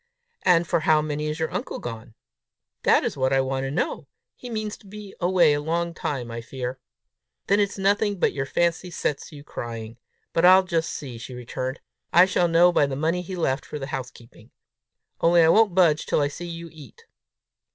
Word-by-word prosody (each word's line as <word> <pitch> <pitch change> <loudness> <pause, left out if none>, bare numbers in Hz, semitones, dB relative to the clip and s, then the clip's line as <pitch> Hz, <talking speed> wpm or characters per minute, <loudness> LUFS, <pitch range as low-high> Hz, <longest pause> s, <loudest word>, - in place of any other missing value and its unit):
"And 175 -2 +3
for - - +1
how 155 -1 +3
many 150 0 -3
is 150 0 -3
your 160 - -2
uncle - - -3
gone?" 115 -1 -8 0.7
"That - - +4
is - - -2
what 130 -1 0
I 135 - +3
want 135 0 -1
to - - -3
know. 145 - -2 0.3
He 250 - -10
means 215 -2 -3
to 200 - -19
be 205 0 -10
away 175 -4 +4
a 145 - -1
long 170 +2 -1
time, 130 -7 -4
I 115 0 -5
fear." 125 +1 -6 0.7
"Then 200 +1 +3
it's 205 -1 0
nothing 200 +1 +1
but - - +1
your 135 -1 -3
fancy 170 +4 0
sets 150 -4 -3
you 145 -2 -11
crying! 115 -3 -7 0.3
But 165 - +1
I'll 185 +1 +8
just 165 -3 -1
see!" 125 -5 -7
she 125 +2 -8
returned. 130 +2 -5 0.3
"I 175 +2 +7
shall 180 -2 +1
know 170 +1 +5
by 145 - +3
the 135 - -4
money 165 +5 0
he 185 +1 -6
left 140 -5 -1
for - - -7
the 135 - -5
house 130 -2 -3
keeping! 115 -1 -18 0.7
Only 170 0 +5
I 160 - +5
won't 210 0 +4
budge 165 -5 +3
till - - +1
I 145 -1 +1
see 175 +4 -7
you 170 0 -7
eat." 150 -7 -15
160 Hz, 205 wpm, -24 LUFS, 135-180 Hz, 0.7 s, I'll